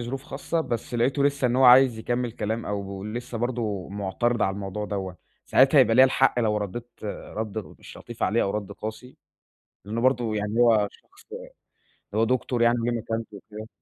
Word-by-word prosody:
ظروف 130 +3 -5
خاصة، 160 +2 -3
بس 120 -5 -4
لقيته 130 +4 +1
لسّه 140 -2 +1
إن 125 +1 0
هو 130 - +4
عايز 125 -2 +7
يكمل 120 +1 -2
كلام، 110 +1 -3
أو 100 -1 -5
لسّه 120 +2 -5
برضه 115 -5 -2
معترض 105 +4 -1
على 95 - +1
الموضوع 100 +1 -5
دوّة، 95 -2 -4 0.3
ساعتها 135 +2 +5
هيبقى 120 -3 +5
ليا 130 +3 +8
الحق 130 -1 +2
لو 105 -2 +1
رديت 105 +4 -5 0.2
رد 110 +1 -5 0.2
مش - - -13
لطيف - - -9
عليه، - - +2
أو 100 - 0
رد 100 -1 -4
قاسي، 110 +5 -8 0.7
لإنه 110 +3 -3
برضه 120 -4 +1
يعني 105 +2 -2
هو 110 -4 +4
شخص 395 - -22 0.9
هو 110 +2 +2
دكتور 125 0 -1
يعني 120 +1 +3
وليه 120 +1 -1
مكانته 115 -2 -4
وكده. 110 +2 -10
115 Hz, 180 wpm, -25 LUFS, 105-125 Hz, 0.9 s, ليا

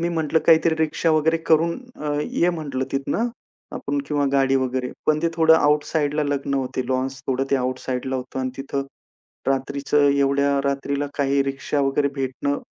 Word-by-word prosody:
मी 170 - 0
म्हटलं 160 -2 +1
काहीतरी 160 0 +5
रिक्षा 160 +1 +1
वगैरे 160 +1 +3
करून 165 +4 +3 0.2
अ, 150 -1 -1
ये 175 +3 +1
म्हटलं 145 -6 -3
तिथनं 170 - 0 0.5
आपण 140 0 -2
किंवा 145 -1 0
गाडी 135 -1 +3
वगैरे, 130 -1 -1 0.2
पण 155 0 +3
ते 170 - +3
थोडं 160 0 +6
आउटसाइडला 150 0 +1
लग्न 140 -1 -1
होते, 130 -1 -1
लॉन्स 130 +1 -1
थोडं 135 0 0
ते 140 - +4
आउटसाइडला 130 0 -2
होतं 130 +1 -6
अन् 130 0 -2
तिथं 135 0 -3 0.6
रात्रीचं 140 +2 +1
एवढ्या 140 0 +2
रात्रीला 140 +1 -1
काही 140 -1 +2
रिक्षा 140 +1 -2
वगैरे 140 +1 +1
भेटणं 135 +1 -2
140 Hz, 160 wpm, -23 LUFS, 135-150 Hz, 0.6 s, थोडं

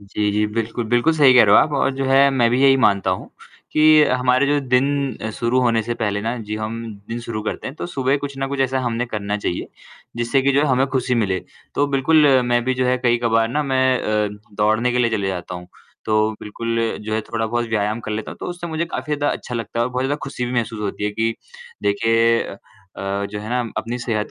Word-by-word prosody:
जी, 105 +1 -2
जी 105 +1 +1
बिल्कुल, 115 +2 -3
बिल्कुल 120 +7 +3
सही 145 -5 +6
कह 125 - +8
रहे 105 0 +5
हो - - +8
आप 155 - 0
और - - +2
जो 135 0 -2
है 135 +1 +5
मैं 125 -4 +2
भी 125 +2 +1
यही 135 -1 +6
मानता 100 -2 +2
हूँ 90 - -3 0.4
कि 155 0 +6
हमारे 125 +1 +2
जो 145 +1 +2
दिन 135 -2 0
शुरू 120 +2 +1
होने 115 -3 +2
से 120 +2 -3
पहले 105 -3 -1
ना 115 +4 -2
जी 105 - -2
हम 110 +1 -4 0.3
दिन 115 +1 -4
शुरू 115 -2 -5
करते 110 - -4
हैं 135 - -6
तो - - -5
सुबह 135 -4 0
कुछ 140 -1 -5
न 135 - -1
कुछ 140 0 -3
ऐसा 130 0 +1
हमने 120 -1 -2
करना 105 -3 -3
चाहिए 95 -4 -3 0.5
जिससे 120 +3 +1
कि 140 +1 +2
जो 140 - +3
है, 150 - +2
हमें 130 0 +2
खुशी 130 -2 -1
मिले। 100 -6 +1 0.4
तो 145 - +2
बिल्कुल, 145 +3 +3 0.2
मैं 120 0 +1
भी 130 +1 0
जो 130 0 0
है 125 0 +2
कई 120 -1 +2
कभार 115 -1 +2
ना 150 +6 0
मैं 130 -2 +2
अ, 105 -2 0 0.3
दौड़ने 110 +4 +2
के 125 - 0
लिए 120 -1 +2
चले 100 -3 -1
जाता 90 -1 -5
हूँ, 90 0 -8 0.4
तो 110 0 +2
बिल्कुल 115 +2 -4 0.3
जो 110 0 -2
है 110 - 0
थोड़ा-बहुत 115 +1 -2
व्यायाम 110 0 -1
कर 110 - -7
लेता 110 0 -4
हूँ, - - -9
तो - - -5
उससे 175 -1 -5
मुझे 160 0 -2
काफ़ी 155 -2 -3
ज़्यादा 145 0 0
अच्छा 125 - -7
लगता 115 0 -4
है 120 - +3
और 125 - -3
बहुत 125 +1 -2
ज़्यादा 145 +2 0
खुशी 135 -2 -4
भी 120 - -4
महसूस 115 -3 -2
होती 105 0 -3
है 105 - 0
कि 110 +2 -1 0.5
देखिए 115 +3 +2
अ - - -8 0.4
अ, 100 +1 -3
जो 105 0 -5
है 105 - -7
ना 125 +1 +1 0.2
अपनी 120 +2 -3
सेहत 110 -3 -2
120 Hz, 245 wpm, -20 LUFS, 110-135 Hz, 0.5 s, कह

